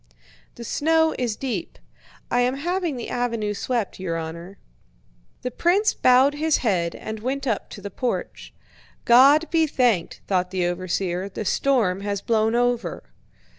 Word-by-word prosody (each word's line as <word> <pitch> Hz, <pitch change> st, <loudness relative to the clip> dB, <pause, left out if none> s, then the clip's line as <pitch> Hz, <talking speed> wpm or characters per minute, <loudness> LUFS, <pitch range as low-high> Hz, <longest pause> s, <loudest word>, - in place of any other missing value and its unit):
"The 235 Hz, -, -9 dB
snow 320 Hz, +6 st, +2 dB
is 240 Hz, -4 st, -1 dB
deep. 235 Hz, -9 st, -4 dB, 0.5 s
I 245 Hz, -, +2 dB
am 250 Hz, +2 st, +1 dB
having 345 Hz, +1 st, -2 dB
the 240 Hz, -, -6 dB
avenue 230 Hz, -4 st, -1 dB
swept, 230 Hz, -1 st, -3 dB
your 170 Hz, -3 st, -3 dB
honor." 170 Hz, +4 st, -7 dB, 0.9 s
The 250 Hz, -, -3 dB
prince 380 Hz, -, +2 dB
bowed 255 Hz, +3 st, +4 dB
his 310 Hz, +1 st, +1 dB
head 175 Hz, -6 st, 0 dB
and 220 Hz, 0 st, -6 dB
went 265 Hz, +5 st, -3 dB
up 225 Hz, -6 st, -2 dB
to 205 Hz, -, -10 dB
the 200 Hz, 0 st, -7 dB
porch. 245 Hz, +5 st, -4 dB, 0.5 s
"God 275 Hz, +7 st, +6 dB
be 325 Hz, -1 st, +3 dB
thanked," 240 Hz, -, 0 dB
thought 180 Hz, -2 st, 0 dB
the 185 Hz, -1 st, -1 dB
overseer, 180 Hz, +1 st, -2 dB
"the 205 Hz, +2 st, -6 dB
storm 200 Hz, -3 st, +1 dB
has 200 Hz, 0 st, -2 dB
blown 220 Hz, +1 st, +1 dB
over!" 240 Hz, -, -1 dB
235 Hz, 150 wpm, -23 LUFS, 190-270 Hz, 0.9 s, God